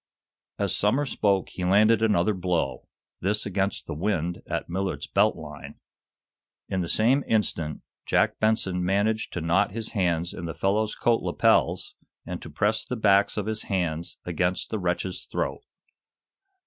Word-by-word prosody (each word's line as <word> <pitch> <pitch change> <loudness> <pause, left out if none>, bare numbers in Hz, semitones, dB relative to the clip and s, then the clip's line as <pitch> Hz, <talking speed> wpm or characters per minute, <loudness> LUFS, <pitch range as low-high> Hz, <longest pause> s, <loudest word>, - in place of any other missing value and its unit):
As - - 0
Somers 130 +7 +1
spoke 100 -3 +1
he 90 - -6
landed 105 +4 +4
another 105 -2 +3
blow, 85 -9 -2 0.3
this 105 +3 0
against 100 0 -1
the - - -5
"wind" 85 0 -1
at - - -3
Millard's 95 +2 -2
belt 105 +2 +2
line. 75 -3 -9 0.9
In 95 - -1
the 85 - -2
same 125 +10 +3
instant 85 -8 0 0.2
Jack - - +2
Benson 105 -5 +1
managed 105 +4 +1
to 90 - -3
knot 85 +5 +2
his 115 0 -4
hands 85 -3 0
in 85 - -6
the 80 - -5
fellow's 105 +2 0
coat 115 -1 +2
lapels, - - +2 0.3
and - - -5
to - - -9
press 105 +2 +1
the 125 - -4
backs 100 -2 +3
of 105 - -1
his 110 0 -1
hands 85 -4 -2
against 90 +1 -1
the 110 - -1
wretch's 90 0 -2
throat. - - -2
95 Hz, 155 wpm, -26 LUFS, 90-110 Hz, 0.9 s, landed